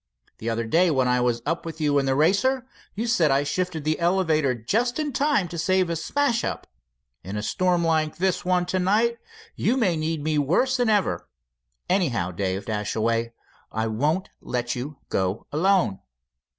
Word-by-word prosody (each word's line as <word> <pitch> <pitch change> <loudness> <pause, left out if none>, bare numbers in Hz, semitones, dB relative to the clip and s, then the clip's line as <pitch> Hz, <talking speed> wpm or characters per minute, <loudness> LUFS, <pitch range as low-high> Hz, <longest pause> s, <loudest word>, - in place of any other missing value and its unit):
The 115 - -3
other 115 0 -1
day 170 +10 +3
when 130 -5 +2
I 125 0 +2
was 120 -1 0
up 165 +3 -1
with 165 -1 -7
you 145 -2 +2
in 135 - -1
the 135 - +2
Racer, 205 - +2 0.3
you. 220 +3 -2
said 180 -10 +3
I 135 +1 +3
shifted 170 +1 -2
the 155 +1 0
elevator 160 -6 +2
just 225 - 0
in 300 -3 -2
time 275 -8 +2
to 170 - -5
save 185 +1 +2
a - - 0
smash 240 - 0
up. - - -3 0.6
In 100 +3 -5
a 105 - -3
storm 180 - +1
like 155 -2 +1
the 190 +1 +2
one 180 -1 +1
to 185 +1 -1
night, 220 +6 +2 0.4
you 250 - +1
my 210 -9 +2
need 160 -1 -2
me 155 -1 +1
worse 215 - +2
than 245 -2 +1
ever. 205 -2 0 0.6
Anyhow, 130 - +1
Dave 95 +2 -2
Dashaway, 115 +2 -1 0.4
I 110 +1 -1
won't 150 - 0
let 120 0 -2
you 135 +4 -6
go 95 +2 -1
alone." 175 - +2
160 Hz, 180 wpm, -24 LUFS, 125-190 Hz, 0.6 s, day